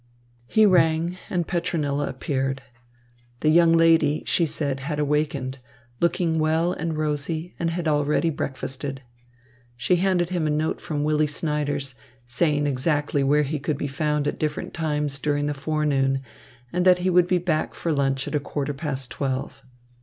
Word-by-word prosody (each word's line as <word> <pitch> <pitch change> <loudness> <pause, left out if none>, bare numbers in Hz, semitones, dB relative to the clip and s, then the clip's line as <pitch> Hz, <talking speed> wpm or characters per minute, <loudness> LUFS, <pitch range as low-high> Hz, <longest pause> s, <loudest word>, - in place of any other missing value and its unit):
He 220 - +4
rang, 170 -1 +3
and 175 -2 0
Petronilla 155 -5 -1
appeared. 135 0 -2 0.8
The 155 - +3
young 170 +1 +6
lady, 165 -2 +4
she 170 - +2
said, 140 -2 -1
had 150 +2 -3
awakened, 140 -3 -1 0.4
looking 170 -1 +1
well 160 +3 +2
and 165 0 -3
rosy, 155 +3 -2
and 170 - 0
had 170 0 -2
already 150 +2 +2
breakfasted. 135 -1 -4 0.7
She 175 +9 +2
handed 180 -2 +1
him 175 -4 0
a - - 0
note 155 +1 -1
from 145 -2 -2
Willy 155 0 +2
Snyders, 145 -2 -2 0.3
saying 145 +4 +1
exactly 145 +1 0
where 145 +2 +3
he 145 +2 -2
could 145 0 -2
be 145 - -2
found 150 +1 -1
at - - -3
different 155 -1 -3
times 150 -3 -2
during 145 -1 0
the 145 - -1
forenoon 140 -2 0 0.5
and 180 0 +1
that 180 -1 +6
he 185 - +3
would 175 0 +4
be 180 0 +3
back 165 -3 -1
for 165 - -1
lunch 135 -2 0
at 150 - -1
quarter 145 0 -3
past 135 -3 -3
twelve. 135 -2 -3
150 Hz, 160 wpm, -24 LUFS, 140-165 Hz, 0.8 s, young